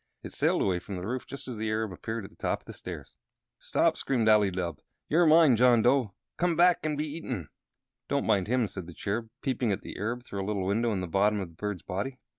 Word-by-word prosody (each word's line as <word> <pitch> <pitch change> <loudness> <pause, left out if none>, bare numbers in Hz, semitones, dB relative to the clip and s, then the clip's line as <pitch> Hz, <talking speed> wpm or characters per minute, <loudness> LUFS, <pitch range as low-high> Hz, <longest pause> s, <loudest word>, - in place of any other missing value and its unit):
It - - -7
sailed - - +2
away 90 -2 +1
from 95 +2 -7
the 90 0 -5
roof 125 +4 -3
just 140 - -8
as 125 -3 -5
the 110 0 -2
Arab 110 -1 -1
appeared 110 +4 -5
at 95 - -10
the - - -21
top - - -2
of - - -31
the - - -9
stairs. - - -8 0.5
"Stop!" - - +2
screamed 120 -5 0
Ali 105 -2 +5
Dubh. 90 -4 -3 0.3
"You're 165 +2 +4
mine, 155 -4 +7
John 120 -1 +5
Dough. 125 -6 +2 0.2
Come 175 -1 +1
back 175 +1 +5
and 155 -1 -1
be 150 - -1
eaten." 135 - -5 0.6
"Don't 140 0 0
mind 100 -4 +2
him," 120 -1 +2
said 95 -3 -7
the 90 - -10
Cherub, 110 +3 -3
peeping 125 -4 0
at 100 - -2
the - - -8
Arab 120 +4 -2
through 100 -5 -4
a - - -5
little 100 -3 -1
window 115 +4 +1
in 95 -3 -1
the 90 - -3
bottom 105 +4 +2
of 95 -3 -4
the 85 - -19
bird's 105 0 -4
body. 115 +9 -4
110 Hz, 245 wpm, -29 LUFS, 95-130 Hz, 0.6 s, mine